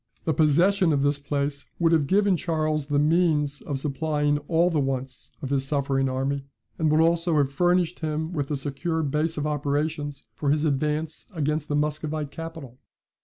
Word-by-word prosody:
The 160 - +2
possession 170 +4 +3
of 140 -1 +1
this 145 0 +1
place 140 0 -3
would 165 -1 +3
have 155 -4 +3
given 200 +1 +3
Charles 155 -3 -1
the 145 -1 +1
means 150 -2 +2
of 145 - -3
supplying 145 +1 0
all 170 +1 +3
the 155 - +1
wants 135 -1 -3
of 135 - -4
his 135 -1 +1
suffering 135 -2 0
army, 135 +2 -1 0.4
and 160 -1 +2
would 155 +1 +3
also 170 0 +2
have 140 -2 +2
furnished 175 +3 +1
him 160 +1 -2
with 145 -4 -2
a 150 - 0
secure 145 +4 -2
base 155 +3 -1
of 150 - -1
operations 145 0 -2
for 145 - -2
his 150 +2 +2
advance 150 +2 -1
against 150 0 -1
the 145 - -1
Muscovite 150 0 -2
capital. 160 -7 -8
150 Hz, 175 wpm, -25 LUFS, 140-160 Hz, 0.4 s, possession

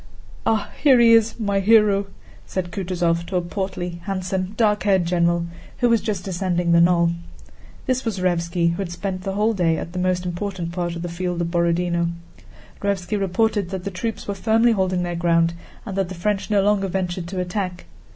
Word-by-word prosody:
"Ah, 215 -2 +1
here 270 -5 +6
he 230 -1 +7
is, 225 +1 +3
my 200 -2 +1
hero!" 205 -1 +4 0.4
said 180 -2 -3
Kutúzov 175 -3 -1
to 190 - -4
a 180 - +2
portly, 175 -2 -4
handsome, 185 0 -2
dark 210 -2 +2
haired 190 -4 +2
general 170 0 +1 0.3
who 245 - +2
was 230 -1 +3
just 205 -3 -3
ascending 175 -2 0
the 170 0 +6
knoll. 170 -1 +4 0.7
This 255 -1 0
was 225 -4 -2
Raévski, 170 -1 +1
who 170 - -4
had 190 -3 -3
spent 185 +1 -4
the 195 +1 -3
whole 210 +3 +2
day 170 -5 +1
at 170 - -6
the 180 - -3
most 180 0 0
important 180 -1 -4
part 175 -1 -3
of 170 - -5
the - - -3
field 175 0 -3
of 170 -1 -1
Borodinó. 170 0 +1 0.7
Raévski 200 0 -1
reported 200 0 0
that 190 -1 -5
the 200 - -4
troops 220 +4 -4
were 200 - -1
firmly 225 +4 +3
holding 185 -4 +1
their 175 0 -2
ground 170 -1 +2 0.3
and 200 -4 -5
that 195 -2 0
the 185 - -6
French 195 +4 -1
no 205 -2 +3
longer 200 -1 +2
ventured 180 -1 -3
to 185 +1 -4
attack. 180 0 -3
185 Hz, 195 wpm, -22 LUFS, 175-200 Hz, 0.7 s, he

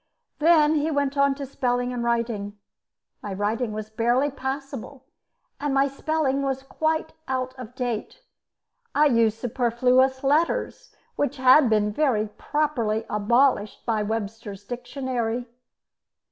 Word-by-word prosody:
Then 310 -1 +5
he 305 0 +1
went 285 -2 0
on 280 -1 +3
to 280 0 -5
spelling 245 -2 -1
and 240 -1 -3
writing. 230 -4 -1 0.6
My 200 -2 -5
writing 215 +4 -1
was 215 0 -6
barely 240 +6 +1
passable, 270 0 -6 0.5
and 285 -1 -1
my 275 +1 +4
spelling 280 0 -1
was 270 -1 -2
quite 315 +3 -1
out 255 -1 -2
of 250 -2 -10
date. 245 - -4 0.7
I 300 - +5
used 230 -5 +3
superfluous 250 +2 +2
letters 315 - 0 0.2
which 290 0 -1
had 260 +1 +6
been 210 -1 +2
very 220 -6 +1
properly 230 -5 -1
abolished 215 +1 +2
by 225 -3 0
Webster's 210 -1 -4
dictionary. 245 0 -3
255 Hz, 125 wpm, -25 LUFS, 225-280 Hz, 0.7 s, had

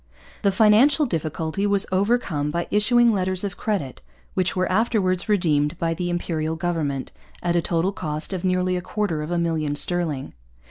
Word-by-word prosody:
The 200 - +3
financial 230 +9 +5
difficulty 160 - -2
was 200 -1 +2
overcome 190 -7 +1
by 170 +3 -2
issuing 235 +3 +4
letters 185 -1 0
of 195 -3 -3
credit, 180 - -3 0.3
which 185 0 0
were 185 0 +1
afterwards 190 -3 +1
redeemed 155 -6 +1
by 165 -1 0
the 175 +1 -3
Imperial 160 -2 -2
government, 160 -6 -2 0.3
at 175 -1 +1
a 170 - +3
total 170 +3 0
cost 155 -1 -4
of 185 -1 -4
nearly 185 0 +1
a 180 - -2
quarter 185 -4 -2
of 150 - -5
a 175 - -1
million 160 -3 -1
sterling. 160 -5 -1
180 Hz, 170 wpm, -23 LUFS, 160-200 Hz, 0.3 s, financial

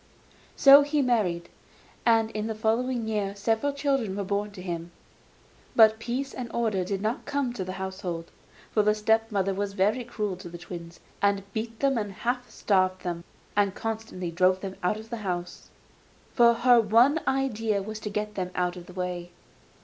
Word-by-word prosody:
So 275 +1 +9
he 290 0 +1
married, 190 -9 +1 0.6
and 225 -1 +4
in 215 0 -3
the 220 - -3
following 230 +2 0
years 205 -2 -2
several 225 +7 +1
children 275 -8 0
were 200 - -2
born 200 +2 -1
to 190 - -9
him; 170 -2 -4 0.9
but 220 -1 +6
peace 255 +4 -3
and 245 -2 -6
order 220 -5 0
did 195 +2 -3
not 220 +3 -2
come 280 -4 -1
to 195 - -4
the 185 0 -5
household. 190 -3 -5 0.4
For 215 - +3
the 210 0 +3
step 220 +1 +2
mother 195 -1 +1
was 200 +1 -3
very 210 +6 +1
cruel 210 -5 -3
to 180 -1 -9
the 175 - -8
twins, 170 -1 -9 0.2
and 200 -1 +2
beat 225 +1 -4
them, 270 -3 +2
and 205 -2 -4
half 245 +4 -2
starved 185 -2 +1
them, 170 -1 -3 0.3
and 200 -2 +2
constantly 220 -6 -4
drove 185 +2 +3
them 195 -1 -5
out 180 +4 +1
of 220 +1 -11
the 235 - -2
house; 180 -4 -5 0.6
for 235 -1 +6
her 240 0 +5
one 235 +9 +4
idea 225 -6 0
was 215 +1 -6
to 215 - -5
get 210 +1 -3
them 185 -3 -3
out 180 0 0
of 175 -1 -10
the 180 - -11
way. 180 -1 -4
210 Hz, 185 wpm, -27 LUFS, 185-235 Hz, 0.9 s, So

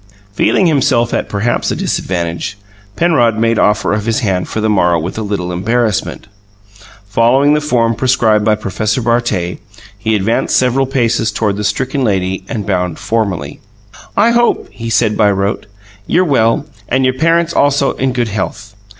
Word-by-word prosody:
Feeling 185 - +2
himself 130 -7 +2
at - - -2
perhaps 105 +4 -1
a - - -1
disadvantage, 85 +1 -3 0.4
Penrod 120 -10 +2
made 115 0 +1
offer 105 0 +2
of 105 +1 -2
his 115 +3 0
hand 95 -5 -1
for - - -3
the 110 - 0
morrow 90 -5 +2
with 85 +4 -5
a - - -2
little 100 -4 -3
embarrassment. 110 +3 -1 0.8
Following 130 +7 +3
the 150 - +1
form 120 -6 +1
prescribed 115 -4 +2
by 110 0 +3
Professor 110 +2 -2
Bartet, 115 -7 -1 0.4
he 110 +2 -1
advanced 105 +3 +1
several 130 +1 +2
paces 115 -4 0
toward 105 -1 -1
the 105 - -4
stricken 130 +5 -1
lady 95 -4 -1
and 105 -3 -4
bowed 90 -4 -1
formally. 95 -10 -2 0.6
"I 220 +4 +4
hope," 240 0 +1
he 115 -1 -6
said 115 -1 +2
by 105 -2 +3
rote, 100 +2 -1 0.4
"you're 185 +2 +2
well, 125 -3 +2 0.2
and 130 +1 +2
your 130 - +2
parents 165 +4 +1
also 140 -1 +2
in 130 0 -1
good 120 -2 -1
health. 105 +1 -4
110 Hz, 165 wpm, -14 LUFS, 100-130 Hz, 0.8 s, I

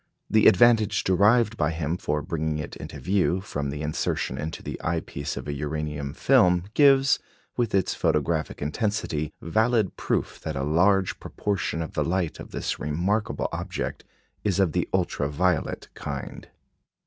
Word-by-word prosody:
The 110 -1 +6
advantage 110 -1 +5
derived 105 +4 +3
by 75 - +1
him 80 0 -2
for 75 -4 -2
bringing 80 -3 -2
it 75 - -6
into 70 - -8
view, 95 +4 +1
from 75 -7 -4
the 75 +2 -4
insertion 75 -3 -1
into 80 +3 -5
the - - -6
eye - - 0
piece 70 +1 -5
of - - -6
a 75 - -2
uranium 75 -1 -4
film, 90 -1 +4
gives, 135 0 +5 0.4
with 120 -5 0
its 95 - +2
photographic 75 0 0
intensity, 80 -2 -1
valid 110 +3 +1
proof - - -1
that - - -5
a 70 - -2
large 95 +6 +2
proportion 100 -5 -2
of 80 - -8
the - - 0
light 90 -2 -1
of - - -9
this - - -3
remarkable 90 +9 -1
object - - -4 0.4
is 100 -2 +1
of 95 -4 +3
the - - -1
ultra 70 - 0
violet 85 +2 0
kind. - - -6
85 Hz, 160 wpm, -26 LUFS, 75-100 Hz, 0.4 s, The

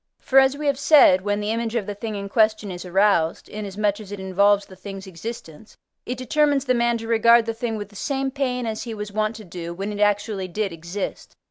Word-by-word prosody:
For, 270 - +4
as 265 +1 +3
we 300 - -5
have 280 -2 +1
said, 280 -11 +6
when 205 +1 -1
the 210 +1 -1
image 230 0 -2
of 225 -4 0
the 205 - -4
thing 215 +1 -5
in 200 0 -5
question, 215 -1 +1
is 180 0 -7
aroused, 180 -3 +2
inasmuch 205 0 -2
as 205 -2 -10
it 205 - -6
involves 200 +2 +2
the 190 - -14
thing's 195 +1 -8
existence, 190 0 -9 0.3
it 250 - -3
determines 285 +2 +1
the 255 - +2
man 235 -1 +1
to 225 0 -7
regard 230 0 +5
the 230 - -2
thing 225 -1 -3
with 205 -1 -6
the 205 - -19
same 270 +5 -2
pain 255 -3 -2
as 220 -1 -3
he 230 -2 -5
was 210 -1 -6
wont 215 +2 -1
to 215 -1 -10
do, 170 -1 -7
when 200 +3 -4
it 205 - -6
actually 205 -1 +1
did 200 0 -3
exist. 170 +4 -6
210 Hz, 235 wpm, -23 LUFS, 195-235 Hz, 0.3 s, said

